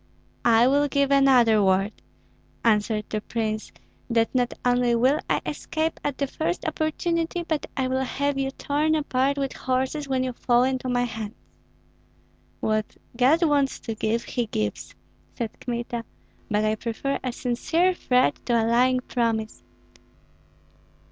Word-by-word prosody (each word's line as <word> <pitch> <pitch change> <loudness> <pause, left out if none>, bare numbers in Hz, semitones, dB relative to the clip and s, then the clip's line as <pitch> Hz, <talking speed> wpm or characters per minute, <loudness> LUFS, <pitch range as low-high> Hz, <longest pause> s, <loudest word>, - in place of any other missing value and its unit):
"I 230 0 +6
will 285 +2 +3
give 280 -1 +1
another 255 -6 +5
word," 195 +2 +2 0.7
answered 210 -1 +2
the 215 - -2
prince, 215 -1 -3 0.4
"that 230 -1 +1
not 245 -2 +1
only 245 -1 +3
will 260 +6 +3
I - - +1
escape 315 0 -2
at 290 -2 -2
the 280 - 0
first 315 +5 -3
opportunity, 330 +2 -1
but 315 -2 -1
I 260 -1 +1
will 260 +1 0
have 280 +2 -1
you 270 0 0
torn 295 +3 0
apart 280 -2 0
with 275 -1 -2
horses, 265 +3 -1
when 260 -1 +1
you 255 -1 -2
fall 240 0 +2
into 260 0 -1
my 245 0 +1
hands." 225 -2 -5 1.3
"What 215 -1 -1 0.2
God 270 +8 +4
wants 285 -4 +2
to 225 - -4
give, 220 +2 -1
he 240 -2 -2
gives!" 105 - -3 0.4
said 230 -3 -5
Kmita. 240 -1 -4 0.5
"But 210 0 +1
I 215 - +2
prefer 235 +5 -3
a 255 - -1
sincere 320 +10 +1
threat 250 - +1
to 240 - +1
a 225 - +1
lying 250 +2 +3
promise. 230 -3 -2
250 Hz, 150 wpm, -25 LUFS, 230-280 Hz, 1.3 s, I